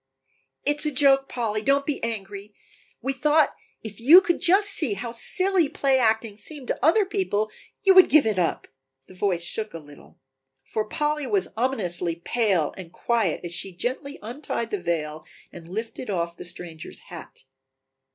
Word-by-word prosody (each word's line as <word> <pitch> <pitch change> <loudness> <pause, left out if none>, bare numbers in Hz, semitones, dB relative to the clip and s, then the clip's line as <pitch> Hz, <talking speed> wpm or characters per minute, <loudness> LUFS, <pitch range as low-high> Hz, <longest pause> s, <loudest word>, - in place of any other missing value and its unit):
"It 290 +1 0
is 305 - +3
a - - 0
joke, 270 0 +3
Polly, 215 -3 -2
don't 275 +4 +2
be 295 - -3
angry; 205 -2 -5 0.5
we 270 +2 0
thought 300 +2 +2 0.3
if 215 -2 -8
you 295 +10 +9
could 345 -2 -1
just 405 +3 +4
see 305 - +1
how 230 +4 -5
silly 365 +7 +2
play 275 -3 +1
acting 220 -2 +1
seemed 280 +2 -5
to - - -3
other 360 +8 +4
people 290 - -1 0.3
you 390 -2 +6
would 370 -1 +8
give 305 -2 +5
it 215 -4 0
up," 170 - -1 0.4
the - - -14
voice 180 -2 -1
shook 215 +3 -4
a - - -3
little. 145 -2 -16 0.5
For 215 +10 -3
Polly 295 +3 -2
was 200 -5 0
ominously 180 -9 -1
pale 185 -3 0
and 180 -3 -10
quiet 225 -7 -1
as 175 - -6
she 180 +2 -4
gently 265 - -4
untied 235 -1 -4
the 205 - -2
veil 155 -3 -3 0.3
and 170 -1 -12
lifted 220 +5 -6
off 170 -3 -2
the - - -9
stranger's 170 -2 -8
hat. 170 -5 -12
225 Hz, 170 wpm, -24 LUFS, 185-280 Hz, 0.5 s, you